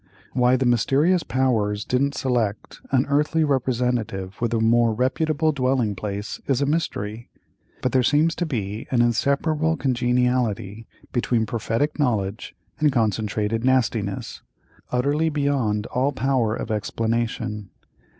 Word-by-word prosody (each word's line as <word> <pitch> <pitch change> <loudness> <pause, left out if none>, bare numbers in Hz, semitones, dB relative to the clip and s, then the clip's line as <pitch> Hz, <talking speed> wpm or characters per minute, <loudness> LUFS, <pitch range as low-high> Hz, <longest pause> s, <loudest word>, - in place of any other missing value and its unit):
Why 125 0 +3
the 130 0 0
mysterious 140 +9 +3
powers 110 -7 0
didn't 140 +3 0
select 115 -5 -2
an 130 0 +2
earthly 150 +3 +2
representative 120 -8 -1
with 120 -1 0
a 115 - +1
more 115 0 +3
reputable 155 +5 +1
dwelling 130 -6 0
place 100 +1 -5
is 135 -3 +2
a 140 - +1
mystery; 120 -8 -2 0.5
but 130 - +1
there 130 - +3
seems 150 +6 +3
to 175 - -1
be 105 -6 -4
an 120 -2 +3
inseparable 150 +6 +1
congeniality 120 -5 0 0.2
between 120 -2 +1
prophetic 115 +7 -2
knowledge 110 -6 -1 0.2
and 150 -1 +3
concentrated 110 -1 0
nastiness, 115 -6 0 0.5
utterly 145 +6 +1
beyond 140 -8 0
all 130 +3 0
power 130 -4 +1
of - - -5
explanation. 110 -1 -2
125 Hz, 125 wpm, -23 LUFS, 110-140 Hz, 0.5 s, Why